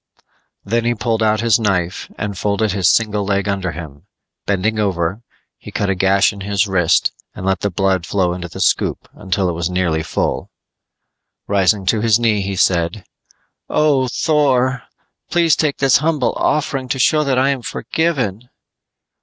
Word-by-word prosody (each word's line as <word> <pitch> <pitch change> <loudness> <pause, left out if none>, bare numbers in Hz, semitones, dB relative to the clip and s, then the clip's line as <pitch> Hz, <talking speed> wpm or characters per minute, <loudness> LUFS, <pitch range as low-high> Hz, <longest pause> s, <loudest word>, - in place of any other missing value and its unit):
Then 115 +3 0
he 120 0 +1
pulled 115 0 -1
out 110 0 +2
his 115 -1 +3
knife 95 -4 -1
and 105 -1 -4
folded 105 +3 0
his 95 -2 +3
single 105 -2 +1
leg 100 0 -1
under 95 -3 -1
him; 75 -4 -10 0.4
bending 100 +3 0
over, 95 0 -1 0.4
he - - -11
cut 100 -1 -1
a - - +2
gash 95 +1 +2
in 100 - -10
his 100 +1 0
wrist 90 -4 +2 0.2
and 95 - -6
let 95 0 +1
the 100 - -1
blood 95 -2 0
flow 90 -3 0
into 90 -1 -6
the - - -8
scoop - - 0
until 95 0 -2
it - - 0
was 85 +1 -2
nearly 90 -3 0
full. - - -2 1.0
Rising 100 0 +2
to 105 +3 +1
his 110 -2 +4
knee 110 -3 +2
he 100 0 -3
said, 90 +1 +1 0.6
"Oh, 145 -4 +2
Thor, 130 -3 +1 0.4
please 170 -2 +3
take 150 -3 0
this 135 -2 +4
humble 155 +2 0
offering 140 -3 -1
to 125 - -2
show 150 +4 +3
that 135 -3 0
I 130 +2 +3
am 135 -2 -1
forgiven." 125 - -2
100 Hz, 170 wpm, -18 LUFS, 95-125 Hz, 1.0 s, his